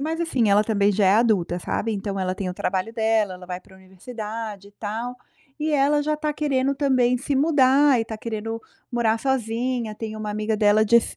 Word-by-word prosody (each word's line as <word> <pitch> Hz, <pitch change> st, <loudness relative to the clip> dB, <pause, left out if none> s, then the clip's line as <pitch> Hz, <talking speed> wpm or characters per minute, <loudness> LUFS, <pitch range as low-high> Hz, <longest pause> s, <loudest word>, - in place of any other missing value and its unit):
mas 320 Hz, +3 st, -2 dB
assim, 260 Hz, -10 st, +1 dB
ela 205 Hz, +1 st, +5 dB
também 205 Hz, -2 st, +2 dB
já 200 Hz, -1 st, +2 dB
é 195 Hz, -, +5 dB
adulta, 210 Hz, -7 st, +2 dB
sabe, 225 Hz, +5 st, -2 dB
então 200 Hz, -1 st, -3 dB
ela 185 Hz, 0 st, -1 dB
tem 195 Hz, -2 st, -3 dB
o 180 Hz, -, -4 dB
trabalho 190 Hz, +5 st, -2 dB
dela, 220 Hz, -3 st, +1 dB
ela 180 Hz, 0 st, -12 dB
vai 180 Hz, 0 st, -5 dB
para 190 Hz, -, -20 dB
universidade 210 Hz, +2 st, -7 dB
e 205 Hz, -, -22 dB
tal, 225 Hz, +4 st, -5 dB, 0.4 s
e 310 Hz, 0 st, 0 dB
ela 290 Hz, +1 st, +3 dB
já 305 Hz, -, +1 dB
está 300 Hz, 0 st, -2 dB
querendo 275 Hz, -3 st, 0 dB
também 255 Hz, -3 st, +2 dB
se 280 Hz, +3 st, -2 dB
mudar, 275 Hz, -1 st, +4 dB
e -, -, +1 dB
está 225 Hz, -1 st, -6 dB
querendo 225 Hz, 0 st, -5 dB, 0.3 s
morar 230 Hz, -2 st, +1 dB
sozinha, 240 Hz, -2 st, -1 dB
tem 220 Hz, 0 st, -6 dB
uma 215 Hz, -1 st, -4 dB
amiga 215 Hz, +1 st, -1 dB
dela 210 Hz, 0 st, +4 dB
de 235 Hz, +2 st, +5 dB
s 235 Hz, -, +1 dB
225 Hz, 210 wpm, -23 LUFS, 205-260 Hz, 0.4 s, ela